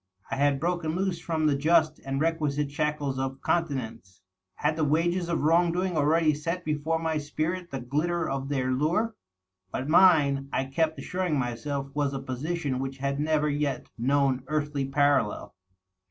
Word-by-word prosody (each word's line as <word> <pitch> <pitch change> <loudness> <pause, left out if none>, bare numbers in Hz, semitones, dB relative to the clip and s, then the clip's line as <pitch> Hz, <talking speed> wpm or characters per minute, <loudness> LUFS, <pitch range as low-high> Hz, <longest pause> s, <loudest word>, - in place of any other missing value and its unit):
I - - 0
had 140 0 +2
broken 170 -1 -1
loose 185 -2 -1
from 160 -2 -1
the 150 -2 +3
just 155 +1 +3
and 135 0 -3
requisite 150 -3 0
shackles 145 -2 -1
of 135 0 -3
continence... 125 - -2 0.4
Had 150 +1 0
the 160 - 0
wages 170 +4 +1
of 170 - 0
wrong 170 +3 +4
doing 180 +1 -1
already 155 +1 +3
set 165 +4 -3
before 155 +1 0
my 160 -1 -1
spirit 165 +5 -3
the 135 - -5
glitter 160 +7 -1
of 135 0 -3
their 130 -3 0
lure? 175 - +1 0.6
But 130 - -3
mine, 150 -5 +5
I 135 - 0
kept 160 +4 0
assuring 180 -4 -1
myself, 135 +3 -3
was 145 -1 0
a - - -2
position 135 +1 -3
which 135 0 -4
had 140 +1 -2
never 150 0 +1
yet 145 -2 -2
known 135 +1 +1
earthly 145 -2 -1
parallel. 140 -5 +1
150 Hz, 165 wpm, -27 LUFS, 135-165 Hz, 0.6 s, mine